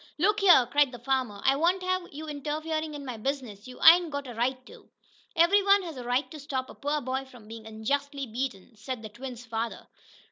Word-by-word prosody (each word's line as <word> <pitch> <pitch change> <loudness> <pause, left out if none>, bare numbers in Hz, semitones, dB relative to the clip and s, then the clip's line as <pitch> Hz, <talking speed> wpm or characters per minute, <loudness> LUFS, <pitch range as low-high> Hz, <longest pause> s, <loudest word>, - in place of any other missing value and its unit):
"Look 410 +6 +2
here!" 355 -11 +7
cried 285 +2 +3
the 245 - -8
farmer. 240 -4 -1
"I 270 - +5
won't 350 +5 +1
have 370 -1 -1
you 305 +2 -7
interferin' 310 +1 -3
in 285 -1 -7
my 250 -3 -5
business! 245 -4 -4
You 250 - -11
ain't 340 +1 +8
got 285 -1 -4
a 245 - -7
right 255 +3 -1
to!" - - -15 0.5
"Every 340 +5 +5
one 395 0 +4
has 330 -4 -7
a 250 - -7
right 245 +4 0
to 310 - -8
stop 265 -2 -4
a - - -11
poor 290 +1 -2
boy 260 +1 -2
from 245 -5 -15
being 225 0 -9
unjustly 275 +6 -2
beaten," 235 -3 -5
said 225 +2 -6
the 215 - -7
twins' 245 +2 -8
father. 225 0 -4
270 Hz, 215 wpm, -28 LUFS, 240-310 Hz, 0.5 s, ain't